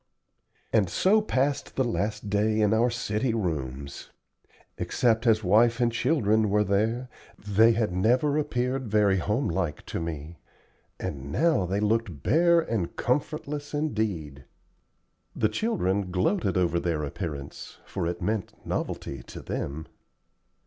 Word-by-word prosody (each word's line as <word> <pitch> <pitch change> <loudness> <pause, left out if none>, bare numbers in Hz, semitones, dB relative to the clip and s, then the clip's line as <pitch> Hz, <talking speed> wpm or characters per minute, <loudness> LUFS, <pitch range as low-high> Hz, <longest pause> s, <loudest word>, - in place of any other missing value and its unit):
And 105 -6 +3
so 200 - +3
passed 140 -8 -1
the 135 - +2
last 105 -3 -2
day 105 +2 +1
in 105 0 +3
our 115 +2 +3
city 115 +1 -1
rooms. 70 - -4 0.7
Except 115 -1 +1
as 110 -1 +4
wife 115 +5 +4
and 120 -1 +2
children 110 -5 +2
were 105 +1 +3
there, 110 +6 0 0.3
they 110 +3 +4
had 110 -3 0
never 125 +10 +2
appeared 130 -3 -1
very 105 -2 +3
homelike 95 - -1
to - - -4
me, 80 0 -6 0.6
and 70 0 -5
now 155 - +2
they 95 +3 0
looked 105 - 0
bare 170 +1 +4
and 110 - -3
comfortless 145 +2 -2
indeed. 100 - -2 0.9
The 110 - +2
children 100 - 0
gloated 95 - +1
over 85 -1 +2
their 85 -3 -1
appearance, 70 -2 -6
for 90 -4 -3
it 85 0 -4
meant 105 -3 -2
novelty 70 -2 -3
to - - -8
them. 75 +3 -4
105 Hz, 130 wpm, -27 LUFS, 90-120 Hz, 0.9 s, as